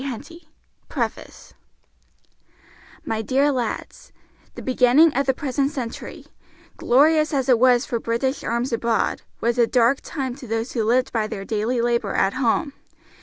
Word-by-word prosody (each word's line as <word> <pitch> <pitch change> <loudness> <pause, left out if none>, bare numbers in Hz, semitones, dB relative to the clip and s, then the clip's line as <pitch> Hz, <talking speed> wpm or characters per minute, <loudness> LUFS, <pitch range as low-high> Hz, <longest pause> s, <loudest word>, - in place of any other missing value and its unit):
Henty 310 +6 -8 0.4
PREFACE - - -5 1.5
My 220 0 -2
Dear 270 +6 +2
Lads: 245 -5 -4 0.4
The - - -8
beginning 260 +5 +4
of 275 0 0
the 265 - +3
present 275 -1 -1
century, 250 -5 -7 0.5
glorious 305 +4 +3
as 265 -1 0
it 250 -3 +4
was 245 -1 +4
for 235 - -2
British 235 +5 -2
arms 235 +1 -2
abroad, 230 0 0 0.2
was 235 +1 0
a 235 - +4
dark 245 +3 +2
time 265 -5 -4
to 265 -4 -10
those 225 +2 -2
who 230 - -1
lived 250 +4 +1
by 220 -2 0
their 200 -3 -6
daily 225 +3 -1
labor 235 -4 0
at 195 - +2
home. 260 +3 0
250 Hz, 150 wpm, -22 LUFS, 230-275 Hz, 1.5 s, beginning